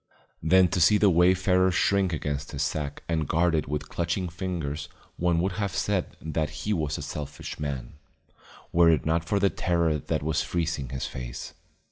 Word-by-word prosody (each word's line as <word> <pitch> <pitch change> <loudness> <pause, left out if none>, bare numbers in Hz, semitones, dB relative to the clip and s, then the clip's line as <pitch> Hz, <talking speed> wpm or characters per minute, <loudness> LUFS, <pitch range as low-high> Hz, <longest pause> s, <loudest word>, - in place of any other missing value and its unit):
Then 90 +3 +5
to 90 - 0
see 95 +6 +6
the 105 -2 +4
wayfarer 90 +2 +4
shrink 95 +1 +2
against 75 -2 -3
his 70 0 -1
sack 75 -1 -3
and 80 -3 0
guard 85 +3 +2
it 80 - 0
with 75 +1 -3
clutching 85 +2 -2
fingers 80 -4 -4 0.3
one 85 -1 +2
would 95 +2 0
have 100 -2 -2
said 95 -1 -1
that 75 -1 -3
he 105 - +1
was 80 -4 -1
a - - -5
selfish 75 0 -6
man, 70 -5 -4 0.8
were 85 0 +6
it 80 -4 +2
not 80 +1 +1
for 100 +4 +1
the 100 -1 +3
terror 85 -4 +1
that 70 - -2
was 80 -1 +1
freezing 80 -6 -2
his 65 -1 -3
face. - - -6
80 Hz, 180 wpm, -27 LUFS, 75-90 Hz, 0.8 s, see